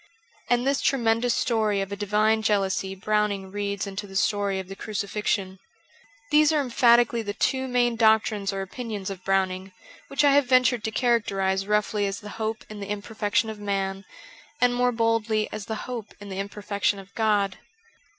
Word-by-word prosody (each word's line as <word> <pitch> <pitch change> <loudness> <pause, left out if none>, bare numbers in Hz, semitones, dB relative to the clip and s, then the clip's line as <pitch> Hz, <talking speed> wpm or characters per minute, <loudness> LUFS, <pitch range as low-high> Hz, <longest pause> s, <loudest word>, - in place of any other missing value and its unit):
And 245 +1 +2
this 275 0 +1
tremendous 235 -2 +2
story 220 -4 +1
of 195 0 -3
a - - -2
divine 210 +2 +2
jealousy 195 -2 0
Browning 205 -1 -1
reads 200 -1 -2
into 200 +1 -6
the 195 - -12
story 200 0 +1
of 190 - -6
the 195 - -8
Crucifixion. 200 -2 -2 0.7
These 300 0 +5
are 310 - +2
emphatically 240 -2 +4
the 205 -2 -5
two 265 +3 0
main 245 -2 +1
doctrines 220 -3 +3
or 195 0 -3
opinions 210 -1 -5
384 - - -2
of 185 - -15
Browning, 190 0 0 0.4
which 275 +1 0
I 285 - +6
hare 285 +1 +6
ventured 255 -3 +3
to - - 0
characterize 195 -5 0
roughly 210 -1 +1
as 195 - -4
the 210 -2 -9
hope 220 0 -3
in 215 -1 -9
the 200 0 -6
imperfection 210 +1 -1
of 215 - -10
man, 195 -1 -2 0.6
and 245 0 +3
more 245 0 +2
boldly 225 -2 +1
as 215 -1 -6
the 220 - -3
hope 235 -4 -6
in 205 0 -10
the 190 0 -5
imperfection 200 0 -1
of 195 0 -12
God. 205 -4 +1
210 Hz, 180 wpm, -25 LUFS, 195-230 Hz, 0.7 s, I